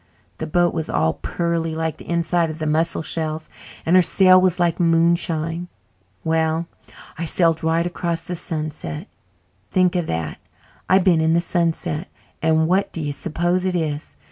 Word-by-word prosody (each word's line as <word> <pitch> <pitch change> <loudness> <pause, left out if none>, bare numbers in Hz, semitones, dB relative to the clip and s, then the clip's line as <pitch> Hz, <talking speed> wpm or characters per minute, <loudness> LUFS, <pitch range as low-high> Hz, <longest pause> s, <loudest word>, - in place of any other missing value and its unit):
The 160 - -3
boat 175 +2 +2
was 160 -2 -3
all 80 0 +1
pearly 170 -2 -2
like 160 -1 -2
the - - -12
inside 170 0 +1
of 155 - -6
the 155 - -3
mussel 160 +2 0
shells, 155 -1 -3 0.4
and 170 - +3
her 185 - +8
sail 185 +1 +5
was 185 -1 +2
like 175 -1 +1
moonshine. 165 0 +1 0.6
Well, 160 +1 +1 0.5
I 170 - -1
sailed 165 -1 +1
right 165 +1 +2
across 170 -1 -2
to - - -16
the 180 - -2
sunset. 155 +1 -5 0.6
Think 185 -1 +2
of 175 -2 0
that 80 -2 -3 0.5
I've 190 0 +5
been 175 -4 +4
in 160 0 +3
the 170 - +4
sunset! 170 -1 -1 0.3
And 160 0 +3
what 190 +3 +1
do - - -5
you 145 -2 -2
suppose 175 +4 -1
it 185 -1 0
is? 155 -3 -3
165 Hz, 170 wpm, -21 LUFS, 160-175 Hz, 0.6 s, her